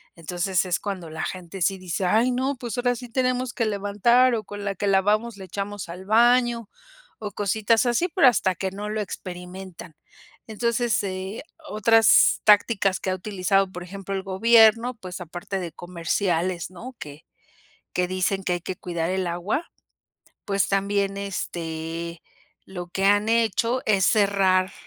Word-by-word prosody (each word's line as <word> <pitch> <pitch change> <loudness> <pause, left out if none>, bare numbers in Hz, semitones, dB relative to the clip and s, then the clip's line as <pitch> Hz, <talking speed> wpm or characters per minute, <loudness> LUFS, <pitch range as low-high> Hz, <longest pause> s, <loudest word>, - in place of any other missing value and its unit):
Entonces, 175 +3 -1
es 180 -1 0
cuando 190 -5 -5
la 160 - -5
gente 185 +1 -6
sí 195 +3 +2
dice: 185 -1 -4
"Ay 225 +7 +3
no, 260 +3 -1
pues, 240 -3 -5
ahora 245 0 +1
sí 245 - -8
tenemos 255 0 0
que 230 - 0
levantar, 215 +5 +3
o 220 - -3
con 205 0 -8
la 200 -1 -2
que 205 - -2
lavamos 205 +3 +2
le 190 - -9
echamos 200 +2 -5
al 175 +2 -8
baño", 235 +1 +3 0.5
o 210 -2 -5
cositas 215 +4 +1
así, 245 +9 +1
pero 335 -8 +6
hasta 190 -6 +3
que 190 +2 -3
no 205 +2 -6
lo 215 0 -2
experimentan. 180 -3 -8 0.5
Entonces, 235 0 0
eh, 190 +2 -5 0.3
otras 225 +1 +5
tácticas 205 -2 +4
que - - -3
ha - - 0
utilizado 195 0 0
por 180 -1 -7
ejemplo 195 +2 -7
el 190 - -3
gobierno, 225 +4 +4
pues, 185 -4 -8
aparte 180 +3 -5
de 170 -2 -5
comerciales, 175 +1 -2
¿no? 235 +8 -9
Que 145 +1 -10 0.7
que 180 0 +2
dicen 185 +1 -1
que 185 - -1
hay 175 - -2
que 185 - -5
cuidar 170 -2 -3
el 190 0 -1
agua, 175 - -3 0.8
pues, 195 -1 +1
también, 195 0 0
este 170 -3 -5 0.4
lo 180 -2 -7
que 190 +2 -2
han 205 +2 +3
hecho 230 +2 +1
es 195 -3 +3
cerrar, 195 -3 +3
195 Hz, 160 wpm, -24 LUFS, 185-220 Hz, 0.8 s, pero